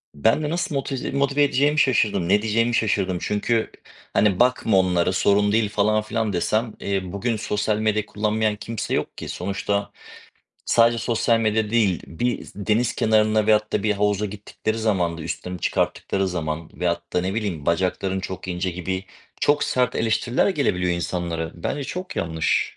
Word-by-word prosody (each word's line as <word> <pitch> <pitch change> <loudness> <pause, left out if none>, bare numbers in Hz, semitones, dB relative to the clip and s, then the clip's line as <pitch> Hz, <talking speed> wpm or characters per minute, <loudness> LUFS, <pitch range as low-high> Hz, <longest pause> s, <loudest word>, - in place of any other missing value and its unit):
Ben 110 - +2
de 150 - -1
nasıl 175 0 -2
motiz 135 -1 -3
motive 140 +1 +2
edeceğimi 145 +2 +2
şaşırdım. 105 -10 +2
Ne 100 +2 +4
diyeceğimi 115 +2 +1
şaşırdım. 95 -5 +1
Çünkü 110 +2 0 0.4
hani, 100 -3 +3
"Bakma 125 -4 +3
onlara 90 -1 +2
sorun 100 +2 +3
değil." 110 -1 +2
falan 105 +1 +2
filan 110 -1 -2
desem, 110 +5 0
eee, 100 -1 -1
bugün 115 +4 -1
sosyal 105 0 -1
medya 110 -1 0
kullanmayan 105 +1 0
kimse 115 +1 -4
yok - - -2
ki. - - -6
Sonuçta 100 +2 -2 0.8
sadece 115 0 +4
sosyal 115 0 +1
medya 110 -1 +1
değil, 105 -7 +2
bir 120 +9 -2
s - - -12 0.2
deniz 115 +2 +2
kenarına 110 -1 +3
veyahut 105 -1 +3
da - - +1
bir 105 0 +2
havuza 105 0 +1
gittikleri 105 +2 -4
zaman 90 -7 0
da - - -6
üstlerini 90 +2 -5
çıkarttıkları 95 -1 0
zaman 80 -2 -4
veyahut 85 -1 -1
da 90 - +2
ne 95 +3 -2
bileyim 95 -10 -3
"Bacakların 95 +2 0
çok 95 -1 -6
ince." 90 +1 -1
gibi 95 +2 -4 0.4
çok 145 0 +3
sert 125 -2 +1
eleştiriler 115 - +1
gelebiliyor 90 - +1
insanlara. 85 -1 -3
Bence 140 +11 -3
çok 180 +4 -6
yanlış. 80 -1 0
105 Hz, 165 wpm, -23 LUFS, 95-115 Hz, 0.8 s, Ne